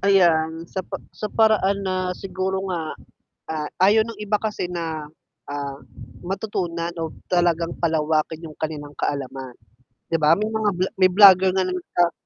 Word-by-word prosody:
Ayan, 165 Hz, -4 st, +3 dB
sa 190 Hz, -, -4 dB
pa 185 Hz, -, -6 dB, 0.2 s
sa 210 Hz, -, -5 dB
paraan 200 Hz, -3 st, +2 dB
na, 185 Hz, -1 st, -1 dB
siguro 190 Hz, 0 st, -3 dB
nga, 160 Hz, -3 st, -3 dB, 0.5 s
ah, 155 Hz, -1 st, -2 dB, 0.2 s
ayaw 215 Hz, +3 st, +5 dB
ng 230 Hz, -, -7 dB
iba 210 Hz, 0 st, +1 dB
kasi 210 Hz, -5 st, -3 dB
na, 160 Hz, -3 st, -4 dB, 0.4 s
ah, 140 Hz, -1 st, -4 dB, 0.5 s
matutunan 175 Hz, -3 st, -3 dB
o 160 Hz, -, -3 dB, 0.2 s
talagang 170 Hz, -2 st, +1 dB
palawakin 160 Hz, 0 st, 0 dB
yung 155 Hz, -, -10 dB
kanilang 150 Hz, -2 st, -5 dB
kaalaman. 135 Hz, -3 st, -4 dB, 0.5 s
'Di 165 Hz, -, +1 dB
ba, 155 Hz, +4 st, +5 dB
may 210 Hz, -, 0 dB
mga 220 Hz, -1 st, 0 dB
vlo 185 Hz, -, +2 dB, 0.2 s
may 185 Hz, -, +7 dB
vlogger 190 Hz, -1 st, +8 dB
nga 185 Hz, 0 st, +1 dB
na 185 Hz, -, -2 dB
nagsa 175 Hz, -1 st, 0 dB
175 Hz, 155 wpm, -23 LUFS, 160-195 Hz, 0.5 s, vlogger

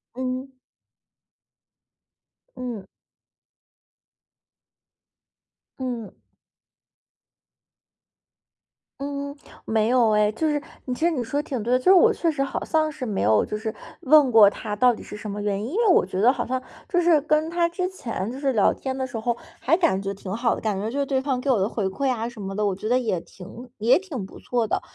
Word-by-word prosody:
嗯。 255 Hz, +1 st, -3 dB, 2.1 s
嗯。 240 Hz, -6 st, -5 dB, 2.9 s
嗯。 240 Hz, -6 st, -4 dB, 2.9 s
嗯， 280 Hz, 0 st, -4 dB, 0.3 s
没 220 Hz, -1 st, +1 dB
有 240 Hz, -2 st, +4 dB
哎， 210 Hz, 0 st, +3 dB
就 225 Hz, +9 st, -2 dB
是 295 Hz, -1 st, 0 dB, 0.2 s
你 255 Hz, -, -3 dB
其 315 Hz, -, -1 dB
实 345 Hz, -, +3 dB
你 265 Hz, -7 st, -1 dB
说 285 Hz, +5 st, -1 dB
的 -, -, -18 dB
挺 250 Hz, -6 st, -3 dB
对 240 Hz, -, -2 dB
的， 255 Hz, -, +4 dB
就 -, -, -13 dB
是 375 Hz, -, +8 dB
我 440 Hz, +4 st, +6 dB
确 335 Hz, -, 0 dB
实 290 Hz, -4 st, 0 dB
好 275 Hz, -, -4 dB
像 310 Hz, -1 st, +1 dB
是 290 Hz, -3 st, -6 dB
没 210 Hz, -4 st, -2 dB
有， 105 Hz, +1 st, +3 dB
就 210 Hz, -, -4 dB
是 220 Hz, 0 st, -4 dB, 0.3 s
问 295 Hz, -1 st, +6 dB
过 220 Hz, -4 st, +8 dB
他 210 Hz, 0 st, -5 dB
到 250 Hz, +3 st, +4 dB
底 -, -, -9 dB
是 -, -, -9 dB
什 210 Hz, 0 st, -6 dB
么 205 Hz, +1 st, -4 dB
原 205 Hz, 0 st, -1 dB
因。 235 Hz, -, -4 dB
因 400 Hz, -, -3 dB
为 465 Hz, -, +3 dB
我 365 Hz, -, +5 dB
觉 185 Hz, 0 st, -4 dB
得 245 Hz, +5 st, +5 dB
好 -, -, -3 dB
像 255 Hz, +1 st, -2 dB, 0.3 s
就 355 Hz, -, +2 dB
是 330 Hz, -4 st, +4 dB
跟 310 Hz, +1 st, +1 dB
他 340 Hz, 0 st, +1 dB
之 365 Hz, +1 st, -2 dB
前， 230 Hz, -, -5 dB
就 250 Hz, -, -6 dB
是 275 Hz, -1 st, 0 dB
聊 210 Hz, -5 st, +3 dB
天 265 Hz, -1 st, -5 dB
的 260 Hz, -1 st, -2 dB
时 245 Hz, -, -6 dB
候， 235 Hz, +1 st, -1 dB, 0.2 s
还 325 Hz, +6 st, +3 dB
感 195 Hz, -, +2 dB
觉 195 Hz, 0 st, -3 dB
挺 195 Hz, 0 st, -6 dB
好 235 Hz, +1 st, +1 dB
的， -, -, -4 dB
感 210 Hz, -3 st, -1 dB
觉 210 Hz, +3 st, -2 dB
就 280 Hz, -, -2 dB
是 280 Hz, -, +1 dB
对 265 Hz, -1 st, 0 dB
方 265 Hz, -2 st, -1 dB
给 275 Hz, -, -3 dB
我 250 Hz, -, +4 dB
的 195 Hz, +3 st, +1 dB
回 210 Hz, -, -2 dB
馈 260 Hz, +8 st, -1 dB
啊 230 Hz, -2 st, -2 dB
什 240 Hz, -3 st, -9 dB
么 195 Hz, 0 st, -5 dB
的， 210 Hz, +1 st, -1 dB
我 195 Hz, -2 st, 0 dB
觉 215 Hz, +3 st, -5 dB
得 250 Hz, -, +3 dB
也 205 Hz, -9 st, -1 dB
挺 230 Hz, +7 st, -12 dB
也 225 Hz, +4 st, +4 dB
挺 310 Hz, -, -6 dB
不 -, -, -13 dB
错 240 Hz, -3 st, -1 dB
的。 -, -, -1 dB
250 Hz, 220 characters per minute, -24 LUFS, 210-280 Hz, 2.9 s, 是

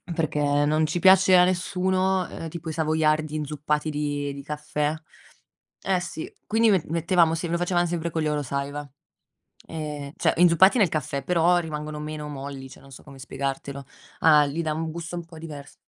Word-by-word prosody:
perché 145 Hz, -2 st, +1 dB
non 155 Hz, +1 st, +2 dB
ci 170 Hz, +3 st, -2 dB
piace 190 Hz, 0 st, +6 dB
a 180 Hz, -, +7 dB
nessuno, 185 Hz, 0 st, 0 dB
ehm, 165 Hz, -, -7 dB
tipo 165 Hz, 0 st, -7 dB
i -, -, -4 dB
savoiardi 155 Hz, -1 st, +1 dB
inzuppati 150 Hz, 0 st, -2 dB
di 145 Hz, -1 st, -2 dB
di 140 Hz, 0 st, -9 dB
caffè 150 Hz, 0 st, -2 dB, 0.9 s
Eh 190 Hz, -1 st, +1 dB
sì, 175 Hz, -2 st, -6 dB, 0.2 s
quindi 225 Hz, +1 st, +3 dB
me 190 Hz, -4 st, +4 dB
mettevamo 165 Hz, 0 st, +2 dB
sem 165 Hz, +1 st, -3 dB
lo 170 Hz, -, +1 dB
facevam 175 Hz, 0 st, +1 dB
sempre 170 Hz, 0 st, -2 dB
con 160 Hz, 0 st, -2 dB
gli -, -, -1 dB
Oro 150 Hz, -1 st, -1 dB
Saiwa, 140 Hz, +2 st, -4 dB, 0.8 s
ehm, 150 Hz, -3 st, -6 dB
cioè -, -, +1 dB
inzuppati 180 Hz, +6 st, +5 dB
nel 200 Hz, -5 st, +4 dB
caffè, 140 Hz, -3 st, -3 dB
però 175 Hz, 0 st, +3 dB
rimangono 150 Hz, -2 st, -5 dB
meno 150 Hz, 0 st, -6 dB
molli, 135 Hz, -1 st, -7 dB
cioè, -, -, -14 dB
non 135 Hz, 0 st, -16 dB
so -, -, -12 dB
come 140 Hz, -2 st, -13 dB
spiegartelo. 135 Hz, +1 st, -5 dB, 0.4 s
A 150 Hz, -2 st, +6 dB
gli 160 Hz, +4 st, -3 dB
dà 155 Hz, -1 st, -1 dB
un 160 Hz, 0 st, -3 dB
gusto 170 Hz, +1 st, -6 dB
un 170 Hz, -, -5 dB
po' 165 Hz, -1 st, -13 dB
divers 150 Hz, -3 st, -9 dB
155 Hz, 185 wpm, -25 LUFS, 145-170 Hz, 0.9 s, a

